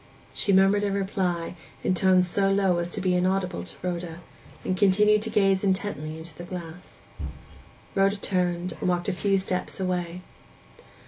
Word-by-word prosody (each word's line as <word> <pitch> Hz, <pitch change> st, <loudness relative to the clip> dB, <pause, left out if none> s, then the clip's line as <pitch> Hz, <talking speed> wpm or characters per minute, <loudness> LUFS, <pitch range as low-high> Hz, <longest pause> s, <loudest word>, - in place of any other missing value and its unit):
She 200 Hz, -, 0 dB
murmured 195 Hz, +2 st, +5 dB
a 200 Hz, -, +1 dB
reply, 190 Hz, -4 st, -1 dB, 0.3 s
in -, -, +2 dB
tones 185 Hz, 0 st, +4 dB
so 195 Hz, +2 st, +1 dB
low 195 Hz, -3 st, +2 dB
as 170 Hz, 0 st, -2 dB
to 200 Hz, -, -4 dB
be 185 Hz, -1 st, +2 dB
inaudible 185 Hz, 0 st, 0 dB
to -, -, -10 dB
Rhoda, 175 Hz, -2 st, -4 dB, 0.4 s
and 185 Hz, -, 0 dB
continued 210 Hz, +2 st, +4 dB
to 225 Hz, -, -2 dB
gaze 195 Hz, -3 st, +3 dB
intently 185 Hz, -6 st, -1 dB
into 160 Hz, 0 st, -10 dB
the 175 Hz, -, -8 dB
glass. 175 Hz, -1 st, -8 dB, 1.0 s
Rhoda 195 Hz, +1 st, +3 dB
turned, 180 Hz, -2 st, 0 dB
and -, -, 0 dB
walked 175 Hz, +1 st, 0 dB
a -, -, 0 dB
few 195 Hz, +1 st, +1 dB
steps 185 Hz, 0 st, -3 dB
away. 180 Hz, -1 st, -2 dB
185 Hz, 165 wpm, -26 LUFS, 175-195 Hz, 1.0 s, murmured